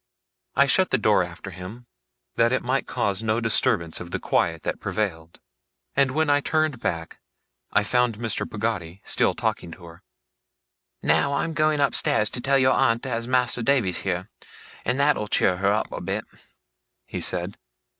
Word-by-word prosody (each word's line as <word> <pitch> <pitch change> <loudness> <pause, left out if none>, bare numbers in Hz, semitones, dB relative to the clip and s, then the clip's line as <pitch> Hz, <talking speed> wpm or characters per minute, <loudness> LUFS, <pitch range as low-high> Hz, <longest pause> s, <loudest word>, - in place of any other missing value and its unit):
I 140 - +5
shut 185 +7 +3
the - - +2
door 105 -3 +3
after 85 +2 -8
him, 95 +8 -9 0.5
that 115 0 +3
it 130 - 0
might 130 +2 -1
cause 100 0 -1
no 110 0 0
disturbance 90 -7 +1
of 90 - -8
the - - -2
quiet 80 -2 0
that - - -3
prevailed; 85 -6 -3 0.6
and 140 -1 +3
when 155 +4 0
I 145 0 +4
turned 155 -4 0
back, 80 -5 -4 0.5
I - - +3
found 125 0 +1
Mr. 115 -2 -2
Peggotty 100 -5 -4
still - - +1
talking 85 - -2
to 90 - -13
her. 85 +2 -14 1.0
'Now, 140 0 +2
I'm 165 - -1
a - - -6
going 155 -1 +2
upstairs 115 -5 +3
to 120 - -3
tell 135 +2 +3
your 130 -1 +4
aunt 115 -1 +2
as 115 -2 -3
Mas'r 125 -1 +1
Davy's 115 -9 +2
here, 95 0 -3 0.6
and 125 +3 0
that'll 140 -7 +2
cheer 90 -3 +2
her 100 +2 +2
up 105 - -1
a - - -5
bit,' - - -3 0.8
he - - -6
said. 90 +2 -2
115 Hz, 175 wpm, -24 LUFS, 95-130 Hz, 1.0 s, I